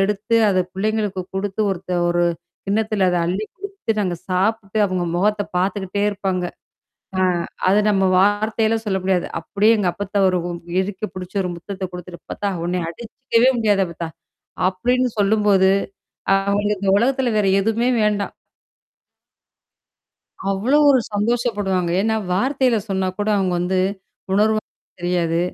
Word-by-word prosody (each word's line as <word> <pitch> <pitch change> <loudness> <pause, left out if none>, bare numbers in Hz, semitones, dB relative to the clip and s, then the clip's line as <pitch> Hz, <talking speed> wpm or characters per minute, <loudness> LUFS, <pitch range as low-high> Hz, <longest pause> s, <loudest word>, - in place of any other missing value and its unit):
எடுத்து, 210 +3 0 0.2
அத 185 - +1 0.2
பிள்ளைங்களுக்கு 205 -1 -1
குடுத்து, 195 +2 -2
ஒருத்த 185 0 -3
ஒரு 175 0 +2 0.4
கிண்ணத்தில 210 -1 +1
அத 180 - +1
அள்ளிக் 195 +5 -3
குடுத்துட்டு, 385 - -3
அந்த 175 -1 -2
சாப்புட்டு, 195 +3 0
அவங்க 185 -2 -1
முகத்த 205 +2 +1 0.2
பார்த்துக்கிட்டே 195 +1 -1
இருப்பாங்க. 190 -2 -2 0.8
ஆ - - +4 0.4
அது 200 +3 +5
நம்ம 195 -2 +2 0.2
வார்த்தையில 215 +3 +2
சொல்ல 190 -2 0
முடியாது. 185 -2 +1 0.2
அப்படியே 205 +6 +2
எங்க 200 -4 0
அப்பாத்தாவ 200 -1 +1
ஒரு 180 - +1 0.4
இறுக்கி 200 +2 -4
புடிச்ச 185 -1 -7
ஒரு 180 - -2
முத்தத்த 190 +2 -6
குடுத்துட்டு, 180 0 -8
"அப்பத்தா! 205 - -3 0.2
ஒன்னைய 175 -1 -1
அடிச்சுக்கவே 235 +5 +1
முடியாது 205 -3 +3
அப்பத்தா." 170 -1 -6 0.6
அப்படின்னு 245 +7 +1
சொல்லும்போது, 200 -2 +4 0.6
அவங்க 200 +1 +1
இந்த 195 0 -1
உலகத்தில 255 +3 +1
வேற 205 - +2
எதுவுமே 225 +4 +1
வேண்டாம். 205 -1 0 2.2
அவ்வளோ 220 +9 +2
ஒரு 260 - +5
சந்தோஷப்படுவாங்க. 205 -5 0
ஏன்னா 220 +2 +1 0.2
வார்த்தையில 255 +3 +2
சொன்னா 190 -1 0
கூட 205 - -1
அவங்க 190 -2 +1
வந்து 185 +1 0 0.5
உணர்வு 215 +2 +3 0.4
தெரியாது. 175 -1 0
200 Hz, 130 wpm, -21 LUFS, 185-215 Hz, 2.2 s, அது